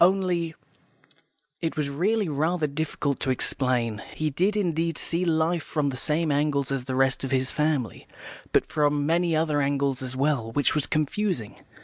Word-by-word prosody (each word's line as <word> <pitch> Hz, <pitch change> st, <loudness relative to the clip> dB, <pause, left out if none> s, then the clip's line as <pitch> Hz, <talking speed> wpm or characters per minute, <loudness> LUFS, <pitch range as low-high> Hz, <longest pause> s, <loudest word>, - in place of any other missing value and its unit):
Only 175 Hz, -3 st, +2 dB, 0.5 s
" -, -, -36 dB
It 165 Hz, -2 st, -2 dB
was 145 Hz, -2 st, -1 dB
really 200 Hz, +8 st, +1 dB
rather 160 Hz, +3 st, 0 dB
difficult 145 Hz, -1 st, -2 dB
to 135 Hz, -, -2 dB
explain. 125 Hz, -4 st, 0 dB
He 155 Hz, -1 st, -1 dB
did 190 Hz, +9 st, +1 dB
indeed 165 Hz, -4 st, 0 dB
see 170 Hz, +2 st, 0 dB
life 165 Hz, +1 st, +1 dB
from 150 Hz, -3 st, -1 dB
the 130 Hz, -, -4 dB
same 155 Hz, +4 st, 0 dB
angle 140 Hz, -1 st, +1 dB
as 135 Hz, -2 st, -2 dB
the 130 Hz, -1 st, -3 dB
rest 135 Hz, 0 st, +2 dB
of 135 Hz, -, -2 dB
his 130 Hz, 0 st, +1 dB
family, 150 Hz, -7 st, -1 dB, 0.4 s
but -, -, +3 dB
from 145 Hz, -1 st, +1 dB
many 170 Hz, +1 st, +2 dB
other 155 Hz, -2 st, +1 dB
angles 140 Hz, -1 st, 0 dB
as 130 Hz, 0 st, -5 dB
well, 135 Hz, -4 st, 0 dB
which 145 Hz, -, +2 dB
was 150 Hz, -, +1 dB
confusing. 155 Hz, -, -1 dB
150 Hz, 170 wpm, -26 LUFS, 135-165 Hz, 0.5 s, but